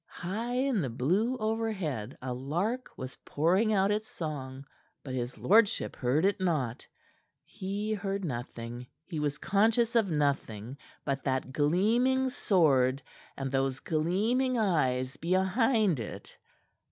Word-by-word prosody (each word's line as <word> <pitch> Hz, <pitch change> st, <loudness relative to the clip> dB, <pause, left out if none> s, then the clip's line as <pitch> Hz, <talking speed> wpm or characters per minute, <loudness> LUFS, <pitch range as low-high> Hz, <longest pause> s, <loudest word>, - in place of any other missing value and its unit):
High 220 Hz, +7 st, -4 dB
in 255 Hz, -5 st, +1 dB
the 135 Hz, -, -2 dB
blue 185 Hz, -, +1 dB
overhead 210 Hz, -, -2 dB
a 130 Hz, -1 st, -2 dB
lark 175 Hz, -, -2 dB
was 130 Hz, 0 st, -7 dB
pouring 185 Hz, +9 st, +2 dB
out 195 Hz, -1 st, +3 dB
its 215 Hz, +1 st, -1 dB
song; 135 Hz, -4 st, -6 dB, 0.4 s
but 130 Hz, -, -6 dB
his 125 Hz, -1 st, -3 dB
lordship 210 Hz, +1 st, +3 dB
heard 135 Hz, +7 st, +1 dB
it 200 Hz, 0 st, +2 dB
not. 150 Hz, -11 st, -1 dB, 0.6 s
He 205 Hz, +3 st, -3 dB
heard 195 Hz, -2 st, -2 dB
nothing, 120 Hz, -2 st, -5 dB, 0.2 s
he 165 Hz, -3 st, -4 dB
was 150 Hz, -1 st, -1 dB
conscious 225 Hz, +4 st, +2 dB
of 220 Hz, -4 st, +3 dB
nothing 135 Hz, -6 st, -1 dB, 0.3 s
but 140 Hz, -2 st, -1 dB
that 130 Hz, -1 st, -1 dB
gleaming 230 Hz, -, +2 dB
sword 140 Hz, -, +3 dB, 0.3 s
and 135 Hz, -1 st, -3 dB
those 135 Hz, -1 st, 0 dB
gleaming 215 Hz, +11 st, +1 dB
eyes 130 Hz, -, +1 dB
behind 190 Hz, -, +2 dB
it. 110 Hz, -, -7 dB
170 Hz, 130 wpm, -30 LUFS, 135-215 Hz, 0.6 s, out